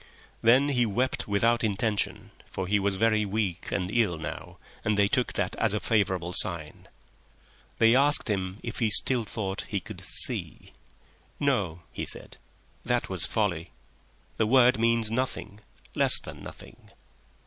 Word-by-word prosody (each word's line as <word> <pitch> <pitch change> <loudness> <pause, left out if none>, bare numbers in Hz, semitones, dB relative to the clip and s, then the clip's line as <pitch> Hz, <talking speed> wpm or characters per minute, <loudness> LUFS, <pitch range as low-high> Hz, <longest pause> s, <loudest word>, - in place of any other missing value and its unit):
Then 130 +5 +3
he 125 -4 +1
wept 120 +4 -2
without 115 +4 0
intention, 105 0 -2 0.2
for 95 - -6
he 105 +2 0
was 100 0 0
very 110 +1 +1
weak 100 -4 -4
and 90 -1 -3
ill 105 -8 0
now, 80 -1 -8 0.3
and 105 -1 -1
they 100 -1 +3
took 125 +4 -1
that 95 -2 -3
as 110 -2 0
a - - -1
favourable 95 -6 -1
sign. 85 -7 +4 0.9
They 115 +1 +4
asked 145 +1 +3
him 95 -3 -3
if 115 - -6
he 115 - +1
still 120 +2 +6
thought 100 -2 -5
he 100 - -3
could - - -11
"see." - - 0 0.7
"No," 100 - -2
he - - -6
said. - - -5 0.5
"That 120 0 -2
was 95 -4 -2
folly. 95 -6 -2 0.7
The 110 - 0
word 125 0 +3
means 115 -1 +1
nothing. 115 -4 -4 0.3
Less - - +5
than - - -11
nothing!" - - -13
105 Hz, 150 wpm, -26 LUFS, 95-115 Hz, 0.9 s, still